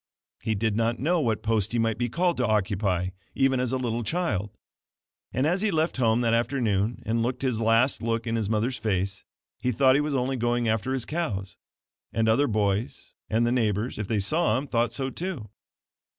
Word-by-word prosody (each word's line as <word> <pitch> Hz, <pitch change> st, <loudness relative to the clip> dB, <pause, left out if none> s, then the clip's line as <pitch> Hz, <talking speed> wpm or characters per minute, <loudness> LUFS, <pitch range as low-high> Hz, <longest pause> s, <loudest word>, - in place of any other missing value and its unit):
He 110 Hz, -, -1 dB
did 110 Hz, +1 st, 0 dB
not 115 Hz, +1 st, +1 dB
know 165 Hz, +5 st, +1 dB
what 115 Hz, -6 st, 0 dB
post 110 Hz, -2 st, 0 dB
he -, -, +1 dB
might 115 Hz, -1 st, 0 dB
be 120 Hz, 0 st, 0 dB
called 175 Hz, +6 st, +1 dB
to 125 Hz, -, +1 dB
occupy, 95 Hz, -3 st, 0 dB, 0.3 s
even 135 Hz, -1 st, +2 dB
as 125 Hz, -1 st, 0 dB
a 130 Hz, -, +1 dB
little 120 Hz, -2 st, -2 dB
child; 115 Hz, -, -1 dB, 0.8 s
and 130 Hz, +3 st, 0 dB
as 180 Hz, +5 st, +1 dB
he 215 Hz, -, +2 dB
left 160 Hz, -4 st, 0 dB
home 115 Hz, -2 st, +3 dB
that 115 Hz, -1 st, +2 dB
afternoon 115 Hz, -3 st, 0 dB
and 115 Hz, +1 st, 0 dB
looked 125 Hz, +3 st, -2 dB
his 125 Hz, -4 st, 0 dB
last 115 Hz, +2 st, +3 dB
look 115 Hz, 0 st, -1 dB
in 115 Hz, 0 st, -1 dB
his 110 Hz, -3 st, -1 dB
mother's 115 Hz, +4 st, 0 dB
face, 95 Hz, -2 st, -1 dB, 0.4 s
he 125 Hz, -, 0 dB
thought 130 Hz, +2 st, +4 dB
he 140 Hz, -, +3 dB
was 150 Hz, -1 st, -1 dB
only 130 Hz, +1 st, 0 dB
going 120 Hz, 0 st, 0 dB
after 115 Hz, +4 st, 0 dB
his 130 Hz, -, -2 dB
cows; 105 Hz, -, -3 dB, 0.6 s
and 115 Hz, 0 st, +1 dB
other 120 Hz, +6 st, +3 dB
boys, 105 Hz, 0 st, -1 dB, 0.2 s
and 115 Hz, +2 st, +2 dB
the 120 Hz, -, +1 dB
neighbors, 110 Hz, -1 st, 0 dB
if 105 Hz, -, -3 dB
they 110 Hz, -1 st, 0 dB
saw 140 Hz, -, +2 dB
him, 135 Hz, -, -3 dB
thought 120 Hz, -4 st, 0 dB
so, 130 Hz, +2 st, -2 dB
too. 165 Hz, -, -5 dB
115 Hz, 205 wpm, -26 LUFS, 110-130 Hz, 0.8 s, thought